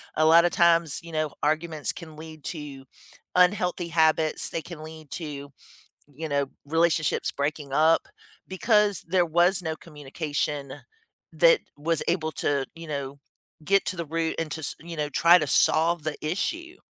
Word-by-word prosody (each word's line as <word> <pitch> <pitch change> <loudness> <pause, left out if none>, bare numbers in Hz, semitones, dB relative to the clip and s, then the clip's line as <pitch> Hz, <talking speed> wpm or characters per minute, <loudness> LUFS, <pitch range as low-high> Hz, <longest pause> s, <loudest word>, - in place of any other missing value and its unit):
A 155 - +3
lotta 170 +2 +6
times, 170 -3 +3
you 170 - -10
know, 155 -2 -2
arguments 155 0 0
can 160 -3 -11
lead 155 -1 -11
to 145 -5 -7 0.5
unhealthy 180 -1 +2
habits, 160 -1 +2
they 165 - -3
can 165 -1 -10
lead 155 -2 -11
to, 145 -4 -6 0.6
you 160 +3 -5
know, 140 -1 0 0.2
relationships 165 0 +1
breaking 145 0 -3
up 160 +3 +3 0.4
because 205 0 +2
there 180 0 +2
was 175 +3 +3
no 160 -2 -2
communication 145 -2 -4 0.6
that - - +5 0.2
was 160 +2 0
able 160 -2 0
to, 140 -1 -1
you 165 0 -9
know, 140 -1 -5 0.5
get 195 +4 +3
to 185 - -2
the 170 -1 -4
root 160 +1 -2
and 165 -1 -2
to 160 - -5
s 145 - -2
you 170 +1 -8
know, 150 -1 -1
try 170 +4 +6
to 155 - -2
solve 165 +2 +3
the 155 -1 -2
issue. 335 - -3
160 Hz, 160 wpm, -26 LUFS, 150-170 Hz, 0.6 s, lotta